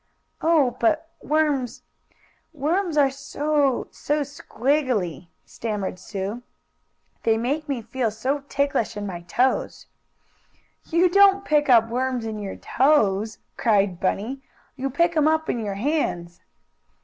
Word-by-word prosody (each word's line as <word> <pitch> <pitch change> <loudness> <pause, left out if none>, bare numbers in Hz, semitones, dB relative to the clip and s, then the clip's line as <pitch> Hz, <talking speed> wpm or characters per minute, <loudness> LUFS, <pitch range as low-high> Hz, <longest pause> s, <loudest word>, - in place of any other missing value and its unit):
"Oh, 300 -7 +3
but 325 0 +1
worms 295 -5 0 0.7
worms 325 +3 -1
are 275 -2 +4
so 280 0 0
so 295 +1 -1
squiggily!" 255 - -1 0.2
stammered 205 -5 -4
Sue. 200 +4 -5 0.8
"They 225 -1 +2
make 285 +7 -2
me 255 -5 -2
feel 235 +1 -1
so 255 +7 -2
ticklish 275 -6 0
in 205 - -4
my 180 -3 -5
toes." 245 +9 0 1.0
"You 340 +2 +3
don't 395 +2 +5
pick 295 -1 +2
up 230 -3 +6
worms 250 0 -1
in 220 -1 -4
your 200 -2 -5
toes!" 220 -7 +2 0.2
cried 200 -6 +2
Bunny. 225 +8 -2 0.3
"You 270 +1 -3
pick 340 +5 +1
'em 310 -1 +4
up 315 0 +1
in 240 - -3
your 200 -2 -3
hands!" 195 - -2
260 Hz, 125 wpm, -24 LUFS, 215-300 Hz, 1.0 s, up